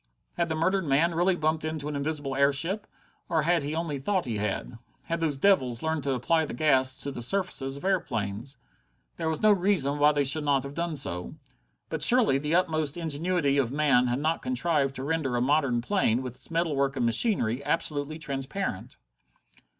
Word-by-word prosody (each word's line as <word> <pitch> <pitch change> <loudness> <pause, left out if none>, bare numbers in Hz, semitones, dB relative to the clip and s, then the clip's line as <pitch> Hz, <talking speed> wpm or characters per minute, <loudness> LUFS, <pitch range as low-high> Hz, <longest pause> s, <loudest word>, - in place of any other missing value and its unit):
Had 170 -1 0
the 160 - -2
murdered 185 +4 +1
man 155 +5 +2
really 175 +3 +2
bumped 155 -1 -1
into 155 -2 -4
an 150 - -4
invisible 145 -1 -2
airship, 145 +9 +1 0.4
or 160 -2 +1
had 170 +1 +2
he 145 +2 -4
only 160 -4 -3
thought 185 +5 -1
he 115 -4 -3
had? 105 +3 -4 0.2
Had 170 -1 -3
those 155 -4 -1
devils 130 -9 +2
learned 160 -2 -1
to 135 - +1
apply 160 +6 +1
the 150 - -5
gas 130 -2 +2
to 140 - -3
the 120 - -6
surfaces 140 -3 -1
of 140 - -9
airplanes? 120 - -2 0.6
There 160 - -2
was 160 +3 -3
no 215 - +6
reason 175 -7 +1
why 145 +1 +5
they 145 -1 +1
should 145 +3 +2
not 140 -2 +1
have 140 0 -7
done 170 0 -3
so. 90 -11 0 0.5
But - - -4
surely 235 - +4
the 150 +3 -1
utmost 155 -4 0
ingenuity 160 -2 0
of 125 -3 0
man 140 -4 +3
had 120 +1 0
not 155 +3 -1
contrived 165 - 0
to 130 - -5
render 145 -4 -1
a - - +1
modern 135 -3 +1
plane, 130 - +1
with 125 -2 -6
its - - -11
metalwork 145 -5 0
and 125 -3 0
machinery, 120 - +2
absolutely 150 -1 -2
transparent? 140 - -4
150 Hz, 190 wpm, -27 LUFS, 135-165 Hz, 0.6 s, no